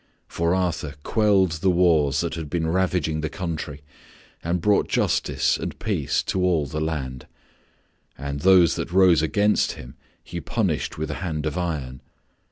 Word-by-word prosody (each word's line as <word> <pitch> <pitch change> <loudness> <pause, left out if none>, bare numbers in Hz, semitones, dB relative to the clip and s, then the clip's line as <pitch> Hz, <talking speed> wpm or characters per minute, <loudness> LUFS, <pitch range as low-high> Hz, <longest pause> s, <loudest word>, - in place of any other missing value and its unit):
For 85 +2 0
Arthur 85 -6 -2
quelled 100 -5 +3
the 95 - +3
wars 80 -6 +3
that 85 -1 -3
had 80 -3 -5
been 85 0 -1
ravaging 85 -3 0
the 80 - -2
country 80 -4 -5 0.6
and 85 +2 0
brought 105 +4 +2
justice - - +1
and - - -5
peace - - -1
to 95 - -1
all 85 -5 +2
the 75 +3 -4
land; 70 -5 -4 0.9
and 70 +1 -4
those 90 0 +5
that - - -4
rose 90 -4 +5
against 105 +6 +2
him 65 +1 -11 0.3
he - - -6
punished - - -2
with 80 0 -3
a 75 - -6
hand 80 -5 -3
of 75 - -2
iron. 75 -8 -3
80 Hz, 160 wpm, -24 LUFS, 75-90 Hz, 0.9 s, those